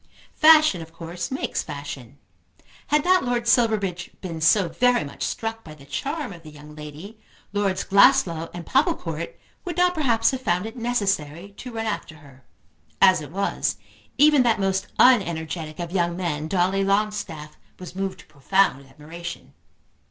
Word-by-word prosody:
Fashion 310 Hz, -, +6 dB
of 160 Hz, 0 st, -10 dB
course 170 Hz, +1 st, -6 dB
makes 265 Hz, -, -2 dB
fashion. 140 Hz, -3 st, -8 dB, 0.7 s
Had 300 Hz, 0 st, +2 dB
not 370 Hz, 0 st, +4 dB
Lord 240 Hz, -2 st, -1 dB
Silverbridge 215 Hz, -7 st, +1 dB
been 165 Hz, -4 st, -6 dB
so 180 Hz, +3 st, +4 dB
very 245 Hz, +9 st, +2 dB
much 140 Hz, -, -10 dB
struck 225 Hz, 0 st, -3 dB
by 155 Hz, -1 st, -11 dB
the 140 Hz, -2 st, -16 dB
charm 280 Hz, -, -4 dB
of 170 Hz, -, -13 dB
the 155 Hz, -, -12 dB
young 150 Hz, 0 st, -13 dB
lady, 155 Hz, +8 st, -10 dB, 0.3 s
Lords 200 Hz, -2 st, 0 dB
Glasslough 170 Hz, -4 st, +4 dB
and 175 Hz, -1 st, -8 dB
Popplecourt 180 Hz, -, -1 dB, 0.2 s
would 350 Hz, -1 st, -5 dB
not 360 Hz, 0 st, +3 dB
perhaps 235 Hz, -9 st, +2 dB
have 260 Hz, -1 st, -4 dB
found 180 Hz, -4 st, 0 dB
it 225 Hz, +2 st, -7 dB
necessary 200 Hz, -, -2 dB
to 250 Hz, -, -8 dB
run 225 Hz, 0 st, -3 dB
after 205 Hz, -6 st, -4 dB
her. 140 Hz, -3 st, -18 dB, 0.6 s
As 185 Hz, -4 st, +5 dB
it 150 Hz, -, -8 dB
was, 195 Hz, +4 st, -1 dB, 0.4 s
even 295 Hz, 0 st, +6 dB
that 235 Hz, -4 st, +2 dB
most 195 Hz, 0 st, 0 dB
unenergetic 165 Hz, -, +2 dB
of 170 Hz, -1 st, -5 dB
young 175 Hz, -2 st, 0 dB
men, 155 Hz, -4 st, -2 dB
Dolly 190 Hz, +3 st, +1 dB
Longstaff, 195 Hz, -7 st, -2 dB, 0.2 s
was 180 Hz, -1 st, -10 dB
moved 195 Hz, 0 st, -4 dB
to -, -, -20 dB
profound 150 Hz, -1 st, 0 dB
admiration. 165 Hz, +5 st, -9 dB
185 Hz, 160 wpm, -23 LUFS, 160-225 Hz, 0.7 s, Fashion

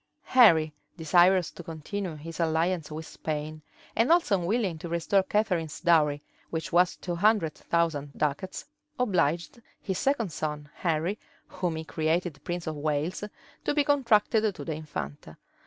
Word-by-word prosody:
{1502.} 260 Hz, -, -1 dB
Henry, 160 Hz, -10 st, +7 dB, 0.2 s
desirous 175 Hz, +2 st, +4 dB
to -, -, -10 dB
continue 165 Hz, +3 st, -5 dB
his 165 Hz, +3 st, -9 dB
alliance 165 Hz, 0 st, 0 dB
with 160 Hz, +1 st, -6 dB
Spain, 155 Hz, 0 st, -5 dB, 0.3 s
and 230 Hz, +7 st, +3 dB
also 335 Hz, -, +4 dB
unwilling 185 Hz, -2 st, 0 dB
to 170 Hz, -, -6 dB
restore 170 Hz, +4 st, +2 dB
Catharine's 185 Hz, -6 st, -1 dB
dowry, 150 Hz, -4 st, +3 dB, 0.3 s
which 160 Hz, -1 st, -4 dB
was 175 Hz, 0 st, +4 dB
two 175 Hz, -, -5 dB
hundred 200 Hz, -5 st, +3 dB
thousand 160 Hz, -4 st, -1 dB
ducats, 150 Hz, +5 st, -2 dB, 0.3 s
obliged 180 Hz, -2 st, 0 dB, 0.2 s
his 190 Hz, -3 st, -3 dB
second 240 Hz, -9 st, +1 dB
son, 150 Hz, -1 st, -4 dB
Henry, 170 Hz, +4 st, -1 dB, 0.3 s
whom 175 Hz, -3 st, -2 dB
he 160 Hz, -, -4 dB
created 160 Hz, 0 st, -1 dB
prince 175 Hz, 0 st, -4 dB
of 155 Hz, -2 st, -4 dB
Wales, 150 Hz, +5 st, -1 dB, 0.4 s
to -, -, 0 dB
be 295 Hz, -, +4 dB
contracted 225 Hz, -6 st, +3 dB
to -, -, -7 dB
the 160 Hz, -, -2 dB
infanta. 150 Hz, -, -7 dB
170 Hz, 150 wpm, -28 LUFS, 155-195 Hz, 0.4 s, Henry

